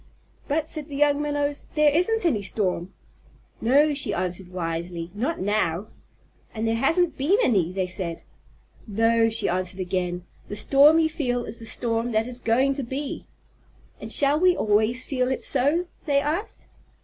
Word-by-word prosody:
"But," 310 +2 0
said 310 -1 -4
the 280 - -6
young 290 0 +2
Minnows, 290 -1 -2
"there 300 -1 +5
isn't 360 +7 +2
any 250 -12 +2
storm." 185 -2 -2 0.7
"No," 285 +6 +4
she 285 - -2
answered 180 0 -3
wisely. 170 -1 -4
"Not 260 +11 -2
now." 200 -1 -1 0.7
"And 220 +1 -2
there 225 - +1
hasn't 325 +7 +1
been 325 +10 +3
any," 190 -9 +2
they 190 0 -1
said. 180 -2 -5 0.6
"No," 225 +2 +2
she 225 - -1
answered 185 +1 -1
again. 180 -1 -2 0.2
"The 205 - -6
storm 280 +8 +5
you 325 -1 +3
feel 245 -6 -2
is 220 - -6
the 225 - -8
storm 230 0 -1
that 220 +1 +2
is 250 0 -5
going 250 +4 +2
to 275 - -4
be." 270 +4 -5 0.7
"And - - -7
shall 285 +1 +3
we 365 0 +4
always 220 +4 +2
feel 255 -2 -1
it 260 - -2
so?" 310 +7 +1 0.2
they 280 -1 +3
asked. 315 +9 -3
240 Hz, 165 wpm, -24 LUFS, 195-290 Hz, 0.7 s, there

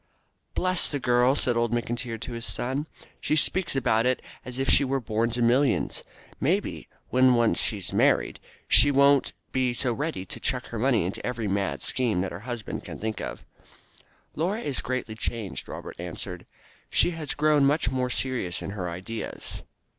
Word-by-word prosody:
"Bless 185 -1 +1
the 145 - -2
girl!" 125 +1 +3
said 125 -4 +1
old 115 -1 +1
McIntyre 120 0 -2
to 125 - -5
his 115 0 -4
son; 135 +5 -2 0.3
"she 155 - 0
speaks 170 +2 +4
about 115 -3 +2
it 130 - +1 0.2
as 125 -1 -6
if 135 0 -1
she 140 - +6
were 135 0 0
born 115 -1 0
to 120 +1 -1
millions. 125 +3 +2 0.4
Maybe, - - -1 0.2
when 130 0 +5
once 120 -1 +2
she 110 - +1
is 95 - -5
married, - - +2 0.3
she 145 - +7
won't 140 0 +4 0.2
be 130 -2 +1
so 120 0 0
ready 145 - -3
to - - -7
chuck 125 -1 -1
her 115 - -4
money 120 -6 +2
into 90 - -4
every 120 -3 -2
mad 100 0 -1
scheme 115 -8 0
that 95 - -3
her 85 - -6
husband 120 -3 -5
can - - -8
think 110 0 -4
of." - - -6 0.9
"Laura 190 +8 -1
is 140 - 0
greatly 130 -3 -3
changed," 110 -3 -4
Robert - - -7
answered; 90 +1 -7 0.4
"she - - +3
has 160 -4 -3
grown 150 -1 +3
much 140 -3 +3
more 130 -1 0
serious 125 -9 -2
in - - -4
her 95 -3 -4
ideas." 95 +6 -5
125 Hz, 180 wpm, -26 LUFS, 110-135 Hz, 0.9 s, she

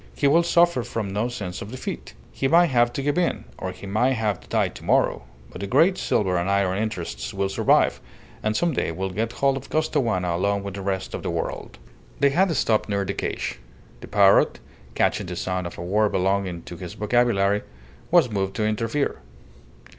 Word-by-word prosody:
He - - -1
will 150 +5 +5
suffer 170 -4 +3
from 115 -4 -4
no 105 +4 0
sense 100 -7 -5
of 100 - -7
defeat. 130 +2 -6 0.2
He 135 - -1
may 170 +5 +6
have 120 -6 +2
to 140 - -3
give 145 +4 +1
in, 175 - 0 0.2
or 95 - -3
he 90 - -11
may 110 +7 +2
have 110 -6 -1
to - - -19
die - - +1
to - - -12
morrow, - - +2 0.3
but - - -9
the 100 - -3
great 175 - +4
silver 95 - 0
and 85 +2 -1
iron 100 -1 +1
interests 90 - -4
will 100 0 0
survive, 95 - +2 0.4
and 110 0 0
some 170 -2 +1
day 105 - -1
will 95 +3 -3
get 110 +5 -2
hold 135 +1 +1
of 135 - -9
Costaguana 115 - 0
along 100 +2 0
with 100 -1 -5
the 100 - -6
rest 95 -1 -3
of - - -4
the - - -3
world." - - -4 0.4
They 140 -1 +4
had 185 +4 +3
stopped 110 -4 +1
near 100 -1 0
the 100 - -2
cage. - - -3 0.4
The - - -10
parrot, 100 -1 +4 0.4
catching - - +1
the 90 - -5
sound 90 0 -2
of 85 - -10
a - - -5
word 105 +4 +1
belonging 95 -2 0
to 85 - -9
his 90 0 -8
vocabulary, 105 -2 +2 0.5
was 170 -5 +5
moved 95 -2 -2
to 110 - 0
interfere. 115 +6 -1
105 Hz, 205 wpm, -24 LUFS, 95-130 Hz, 0.5 s, may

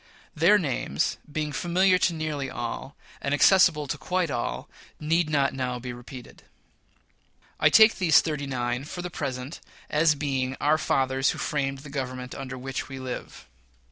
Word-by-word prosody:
Their 175 +7 +5
names, 150 -3 -1
being 150 0 -2
familiar 180 +4 +2
to 175 - +2
nearly 150 -4 -3
all, 120 +3 -5 0.3
and 140 +1 0
accessible 165 -2 +5
to 135 - -4
quite 180 -4 -1
all, 120 - -3 0.3
need 160 +1 +1
not 140 -2 +1
now 125 -2 -2
be 125 0 -6
repeated. 120 0 -11 1.2
I - - +5
take 220 -1 +6
these 170 -5 +6
"thirty 150 -3 -3
nine," 125 -1 -2
for 175 +3 -6
the 180 - -5
present, 135 -1 -5 0.3
as 150 0 +4
being 135 -3 -2
our 155 +2 +2
"fathers 135 -2 +1
who - - -2
framed 135 -2 -2
the - - -8
Government 130 -2 -5
under 135 -1 -6
which 135 +2 -5
we 135 - -7
live." 130 - -7
140 Hz, 160 wpm, -26 LUFS, 130-160 Hz, 1.2 s, take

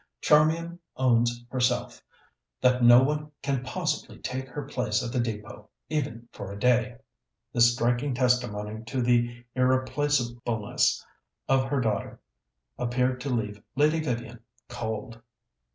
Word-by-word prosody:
Charmian 165 +3 +3 0.2
owns 120 -1 +2
herself 125 -1 0 0.6
that 125 -1 +3
no 120 +2 +8
one 150 +2 -1
can 140 -2 0
possibly 155 +2 -3
take 130 +1 -4
her 140 +3 -6
place 125 -6 -1
at 120 - -4
the 125 - -1
Depôt, 115 -1 -4 0.2
even 135 -6 -3
for 100 - -7
a 100 - -7
day." 125 +1 +2 0.6
This 120 0 +6
striking 120 +3 0
testimony 110 -4 0
to 130 +2 -2
the 120 0 +1
irreplacableness 130 -4 +1 0.4
of 135 -1 +3
her 135 0 0
daughter 105 -4 -2 0.6
appeared 125 +1 0
to 140 - -3
leave 105 -4 -2
Lady 150 +3 +3
Vivian 120 -5 -3 0.3
cold. 115 -1 -5
125 Hz, 125 wpm, -27 LUFS, 120-135 Hz, 0.6 s, no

